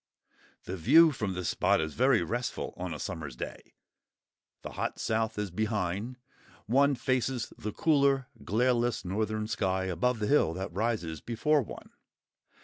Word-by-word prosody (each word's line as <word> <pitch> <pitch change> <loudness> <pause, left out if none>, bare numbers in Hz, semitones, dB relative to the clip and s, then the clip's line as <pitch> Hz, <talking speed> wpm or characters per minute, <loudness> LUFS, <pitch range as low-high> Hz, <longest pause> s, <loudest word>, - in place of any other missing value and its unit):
The 95 - -5
view 155 - +6
from 105 -8 -3
this 90 -2 -2
spot - - +2
is 80 -1 -2
very 125 -5 +3
restful 120 +7 -3
on 90 0 -5
a 75 - -4
summer's 80 -6 -5
day: - - -8 0.9
the - - -6
hot - - -3
south 110 0 -1
is 105 -3 -2
behind; 105 +3 -2 0.5
one 140 +5 +3
faces 130 -2 -1
the 105 - -5
cooler, 140 -3 +2 0.2
glareless 120 - +1
northern 110 +3 -1
sky 95 -3 0
above 95 +7 0
the 105 - -2
hill 105 - +3
that 95 -1 -5
rises 100 -6 -2
before 145 +6 +1
one. 120 - -9
110 Hz, 145 wpm, -30 LUFS, 95-125 Hz, 0.9 s, view